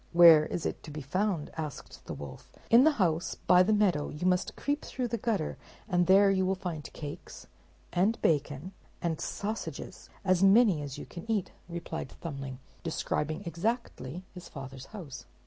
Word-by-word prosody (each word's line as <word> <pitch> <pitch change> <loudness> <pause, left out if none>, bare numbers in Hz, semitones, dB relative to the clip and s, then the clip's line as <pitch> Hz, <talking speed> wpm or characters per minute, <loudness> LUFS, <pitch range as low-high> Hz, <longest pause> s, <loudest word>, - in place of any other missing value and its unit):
"Where 165 -3 +9
is 170 - -3
it - - -2
to - - -10
be 150 -1 -6
found?" 180 +2 -1
asked 150 -4 -6
the - - -4
wolf 70 -1 -9 0.2
"In 240 +4 +8
the 315 - +5
house 175 -4 +1
by 180 0 +5
the 185 - +3
meadow; 195 -8 +2
you 150 +4 -5
must 180 0 +1
creep 290 +1 -1
through 250 -2 -3
the 235 0 -2
gutter, 205 -8 -1 0.3
and 175 -4 +2
there 195 +1 +7
you 190 -1 +2
will 190 +1 +1
find 175 -6 -5
cakes, 145 -2 -8 0.5
and 195 +6 +2
bacon, 145 +2 0 0.3
and 165 -3 -2
sausages, 215 +2 -5 0.2
as 185 -1 +3
many 195 -4 +6
as 140 -2 -6
you - - -7
can 175 +6 -10
eat," 205 -5 0 0.2
replied 170 -5 -5
Thumbling, 135 -5 -5 0.2
describing 155 0 -2
exactly 175 - -3
his 180 -1 -10
father's 135 -2 -8
house. 160 - -9
175 Hz, 170 wpm, -30 LUFS, 150-200 Hz, 0.5 s, Where